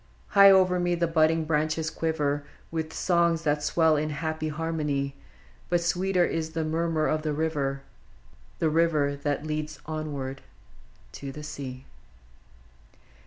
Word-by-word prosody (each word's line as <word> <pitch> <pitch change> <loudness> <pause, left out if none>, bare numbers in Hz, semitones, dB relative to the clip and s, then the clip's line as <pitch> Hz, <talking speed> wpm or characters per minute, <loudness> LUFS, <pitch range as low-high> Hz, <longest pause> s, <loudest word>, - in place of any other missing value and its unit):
High 200 -1 +8
over 185 -2 +5
me 175 0 +1
the 170 0 +1
budding 160 -1 +2
branches 155 +1 0
quiver 145 -3 -1 0.3
W;th 160 -1 -3
songs 170 -2 +1
that 150 -1 +1
swell 160 +1 +3
in 155 +1 0
happy 155 +1 -3
harmony; 150 -3 -2 0.5
But 175 0 +3
sweeter 180 +1 +2
is 160 -1 -3
the 160 - -1
murmur 160 0 0
of 155 0 +1
the 155 -1 -2
river, 145 -3 -1 0.4
— - - -28
The 160 - +1
river 155 -3 +2
that 145 +1 -2
leads 155 0 -4
ever 145 -4 -4 0.7
to 140 -1 -7
the 150 +2 -9
sea 135 -3 -7
155 Hz, 140 wpm, -27 LUFS, 145-165 Hz, 0.7 s, High